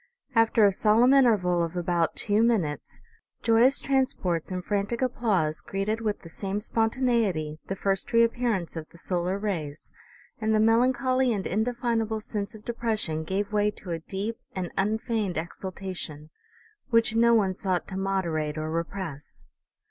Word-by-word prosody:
After 225 -1 +4
a 200 - +5
sol 215 +3 +3
emn 255 +2 +6
interval 205 -10 +4
of 170 +1 -2
about 175 -1 0
two 210 0 +2
minutes, 205 -11 0 0.4
joyous 235 +4 +4
transports 255 - 0
and 180 -1 -4
frantic 205 +3 -1
applause 210 -11 0
greeted 210 +3 -2
with 210 -2 -2
the 170 - -11
same 195 +4 -3
spontaneity 225 -9 0
the 195 - -2
first 195 +2 -1
reappearance 230 -6 +1
of 160 -1 -6
the - - -17
solar 180 +2 -1
rays, 165 -8 -4 0.5
and 220 0 +1
the - - +3
melancholy 250 +3 +3
and 200 -4 -2
indefinable 225 0 0
sense 210 0 -5
of 215 - -13
depression 220 -9 -2
gave 200 +5 -2
way 210 0 +3
to 205 -3 -8
a 165 - -2
deep 200 +7 -4 0.2
and 180 -2 -3
un 210 +3 +1
feigned 220 -6 -2
exultation 170 -3 -6 0.6
which 230 -1 +3
no 235 +1 +5
one 195 -4 +2
sought 185 -2 -1
to 190 - -6
moderate 170 -6 -1
or 155 0 -3
repress." 165 -3 -5
205 Hz, 155 wpm, -27 LUFS, 175-230 Hz, 0.6 s, emn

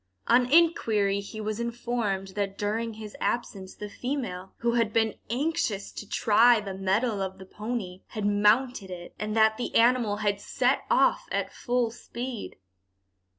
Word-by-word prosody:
On 245 +1 +3
inquiry 220 -12 +3
he 200 +2 -8
was 215 +1 -3
informed 235 -5 -2
that 195 0 -3
during 220 +2 -2
his 215 -1 -9
absence 195 -5 -2
the 210 - -6
female, 210 -6 -4
who 235 0 0
had 230 -2 +1
been 220 -1 +2 0.2
anxious 240 -6 -1
to 210 - -9
try 230 +2 +5
the 200 -2 -5
mettle 195 +3 0
of 190 0 -3
the 190 - -11
pony, 210 -3 -5
had 215 -2 -4
mounted 210 +2 +2
it, 175 -1 -8
and 215 +1 -2
that 220 0 +4
the 245 - -4
animal 235 -3 +4
had 205 -1 0
set - - +1
off - - +3
at - - -2
full 245 -2 0
speed. 240 0 -6
215 Hz, 155 wpm, -27 LUFS, 200-240 Hz, 0.2 s, try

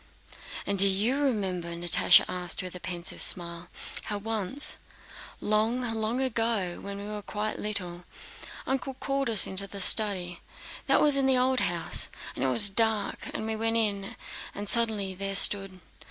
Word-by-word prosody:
"And 200 -1 -3
do 200 - +6
you 215 +8 -1
remember," 190 -10 -3
Natásha 170 0 +3
asked 180 0 -4
with 185 - -8
a 180 - -9
pensive 175 -1 -6
smile, 170 0 0 0.4
"how 210 - -4
once, 220 +5 +1 0.6
long, 220 +4 -1
long 225 0 -3
ago, 225 -8 -2
when 200 0 -8
we 200 - -8
were 210 0 -7
quite 210 +1 -5
little, 180 -4 -5 0.6
Uncle 265 0 -4
called 275 -1 -3
us 220 -3 +6
into 195 +1 0
the 200 0 -9
study—that 185 -3 +2
was 295 -2 +2
in 270 -1 0
the 260 -1 +2
old 255 +1 +1
house—and 175 -5 -3
it - - 0
was 200 - +5
dark—we 220 0 -2
went 225 +1 -2
in 200 -3 -2 0.4
and 205 +1 -7
suddenly 215 -4 0
there 195 +1 -4
stood..." 195 -1 +7
205 Hz, 150 wpm, -26 LUFS, 185-225 Hz, 0.6 s, stood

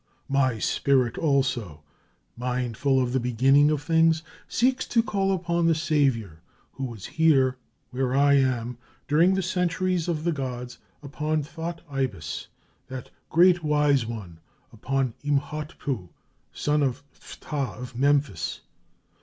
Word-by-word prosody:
My 130 -4 +2
spirit 125 +2 +1
also, 130 - 0 0.5
mindful 125 +2 0
of 125 -1 0
the 130 - +2
beginning 130 +4 +4
of 150 -2 -1
things, 160 0 +3 0.2
seeks 255 +2 +1
to 230 -1 +2
call 195 -3 0
upon 170 -2 0
the 165 - +4
savior 135 - 0 0.3
who 135 - -5
was 115 -6 -7
here 135 -6 +3 0.3
where 130 0 -1
I 140 +1 +5
am, 125 -3 +1 0.3
during 170 +6 +4
the 190 - 0
centuries 180 -1 0
of 160 -3 -1
the 170 - +1
gods, 125 -4 -5 0.2
upon 150 +2 -2
Thot 165 +2 -6
Ibis, 130 - -3 0.4
that 130 -1 -8 0.2
great 175 +1 +5
wise 150 -3 +3
one, 100 -8 -7 0.3
upon 130 +2 -1
Imhotpu, 145 - -2 0.4
son 150 0 0
of 140 0 -1
Phtah 140 -4 -5
of 125 -1 -8
Memphis. 140 - +1
140 Hz, 130 wpm, -26 LUFS, 125-160 Hz, 0.5 s, I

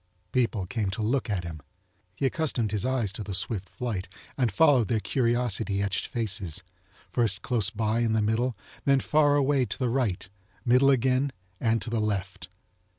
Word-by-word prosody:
People 115 -6 +1
came 105 0 -2
to 100 +4 -3
look 125 +3 0
at 95 -4 -1
him. 80 -3 -7 0.5
He 135 - -1
accustomed 130 -7 0
his 110 +3 -1
eyes 120 -7 0
to 110 - -3
the 100 -2 -4
swift 95 -1 -2
flite 110 -6 -4 0.3
and 125 -5 +1
followed 130 -2 +4
their 110 - +1
curiosity 115 -4 0
etched 100 -2 -1
faces, 100 -7 -2 0.5
first 115 -5 0
close 110 -5 +2
by 110 +1 0
in 115 -2 +1
the 110 - +2
middle, 115 +3 +1 0.3
then 140 -1 +4
far 145 0 +3
away 140 -1 +3
to - - -4
the 125 -3 0
right, 115 -8 0 0.4
middle 125 +3 +5
again, 130 +1 +2 0.3
and 115 -2 +1
to 115 - -4
the 115 -2 +1
left. 105 -3 -3
115 Hz, 175 wpm, -27 LUFS, 105-130 Hz, 0.5 s, middle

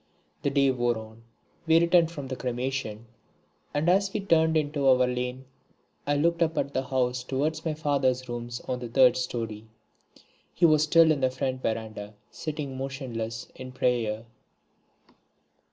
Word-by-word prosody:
The - - +1
day 140 -1 +3
wore 120 -2 0
on, 110 +1 -11 0.5
we 165 +1 +6
returned 170 -1 +4
from 145 -5 -7
the 130 - -4
cremation, 125 -3 -3 0.7
and 145 +3 -1
as 195 +2 +3
we 215 - -2
turned 160 -4 +3
into 145 -2 0
our 130 -1 +5
lane 125 +1 -3 0.6
I 145 - +2
looked 170 +3 +1
up 160 -1 +1
at 140 0 -1
the 130 - -1
house 125 -1 0
towards 150 +5 -2
my 160 -2 -2
father's 135 -4 0
rooms 120 0 -5
on 125 -1 -4
the 120 -1 -6
third 125 0 +5
storey. 115 -4 -4 0.9
He 170 - +4
was 155 -2 +5
still 160 +1 +5
in 145 -3 0
the 130 - +3
front 130 0 -3
verandah 110 -2 -4 0.2
sitting 150 -4 -5
motionless 125 -5 -5
in 130 0 -9
prayer. 115 -3 0
130 Hz, 155 wpm, -27 LUFS, 120-155 Hz, 0.9 s, we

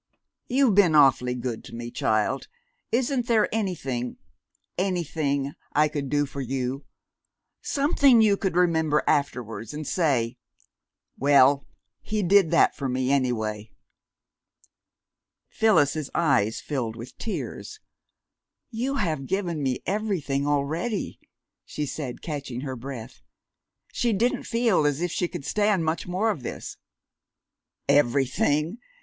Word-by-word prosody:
You've 255 -3 +3
been 185 -5 +5
awfully 130 -4 +4
good 120 -2 -4
to 115 - -10
me, 120 0 -6
child 110 +5 0 0.4
isn't 245 0 0
there 225 -3 +3
anything 135 - -2 0.6
anything 155 -7 -1 0.2
I 150 +1 +3
could 145 -3 -4
do 145 +1 +2
for 140 0 -6
you 130 +1 -3 0.8
something 280 -3 +4
you 215 -2 +5
could 190 -3 -2
remember 160 -4 +2
afterwards, 120 -5 -1
and 155 0 -5
say, 135 -9 0 0.8
'Well, 140 0 +5 0.3
he 215 -1 -2
did 190 -1 +5
that 170 - +4
for 135 -2 -3
me, 130 +1 0
any 130 -3 +2
way?'" 110 -2 -4 1.8
Phyllis's 155 -9 +2
eyes 130 -10 +2
filled 120 -6 -3
with 120 +2 -10
tears. 425 - -5 0.9
"You 250 +4 -2
have 155 - -1
given 180 -5 -1
me 130 -2 -1
everything 175 -9 -1
already," 155 +9 -1 0.4
she 150 - -4
said, 135 -3 -6
catching 140 -6 -5
her 135 -2 -4
breath. 125 -1 -8 0.7
She 235 -2 +1
didn't 230 +5 0
feel 230 -10 +2
as 145 0 0
if 175 0 -1
she 175 - 0
could 170 -5 -7
stand 205 -5 +1
much 160 +2 -2
more 195 +5 +1
of 155 - -5
this. - - -6 1.1
"Everything!" 145 - +2
150 Hz, 125 wpm, -25 LUFS, 130-195 Hz, 1.8 s, been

